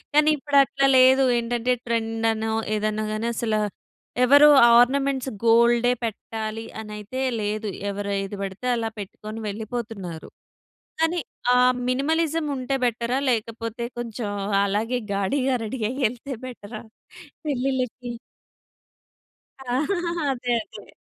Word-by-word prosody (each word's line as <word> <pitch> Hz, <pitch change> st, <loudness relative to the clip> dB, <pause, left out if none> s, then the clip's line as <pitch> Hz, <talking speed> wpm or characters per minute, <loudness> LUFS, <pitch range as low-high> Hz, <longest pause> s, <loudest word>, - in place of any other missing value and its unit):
కానీ 300 Hz, +1 st, +5 dB
ఇప్పుడు 285 Hz, 0 st, -1 dB
అట్లా 275 Hz, 0 st, +1 dB
లేదు 260 Hz, +1 st, +6 dB
ఏంటంటే, 240 Hz, +1 st, 0 dB
ట్రెండ్ 225 Hz, -1 st, -1 dB
అనో, 220 Hz, 0 st, -2 dB, 0.2 s
ఏదన్నా 215 Hz, 0 st, -1 dB
గాని 215 Hz, +2 st, -2 dB
అసల. 220 Hz, -1 st, -1 dB, 0.7 s
ఎవరు 285 Hz, +3 st, +8 dB, 0.3 s
ఆర్నమెంట్స్ 265 Hz, +1 st, +2 dB, 0.2 s
గోల్డే 235 Hz, +1 st, +5 dB
పెట్టాలి 225 Hz, 0 st, -4 dB
అని 215 Hz, -1 st, -8 dB
అయితే 210 Hz, +5 st, -6 dB, 0.2 s
లేదు. 210 Hz, +1 st, -2 dB, 0.2 s
ఎవరు 200 Hz, 0 st, -4 dB
ఏది 195 Hz, +1 st, -6 dB
పడితే 195 Hz, +5 st, -5 dB
అలా 225 Hz, -1 st, -1 dB
పెట్టుకొని 215 Hz, +2 st, -8 dB
వెళ్ళిపోతున్నారు. 215 Hz, -5 st, -6 dB, 0.7 s
కానీ, 330 Hz, +2 st, +2 dB, 0.3 s
ఆ -, -, +5 dB, 0.3 s
మినిమలిజం 315 Hz, +4 st, 0 dB
ఉంటే 260 Hz, +1 st, -2 dB
బెట‌రా? 240 Hz, +1 st, 0 dB
లేకపోతే 230 Hz, 0 st, -2 dB
కొంచెం 235 Hz, -2 st, -4 dB, 0.4 s
అలాగే 215 Hz, +5 st, 0 dB, 0.2 s
గాడిగా 255 Hz, +7 st, 0 dB
రెడీ 225 Hz, +4 st, -5 dB
అయ్యి 260 Hz, +2 st, -3 dB
యేళ్తే 250 Hz, +4 st, -3 dB
బెట‌రా 220 Hz, -3 st, -8 dB, 0.6 s
పె‌ళ్ళిళ్ళకి? 255 Hz, -3 st, -2 dB, 2.2 s
అదే. 245 Hz, -1 st, -1 dB
అదే. -, -, -14 dB
235 Hz, 110 wpm, -24 LUFS, 215-260 Hz, 2.2 s, ఎవరు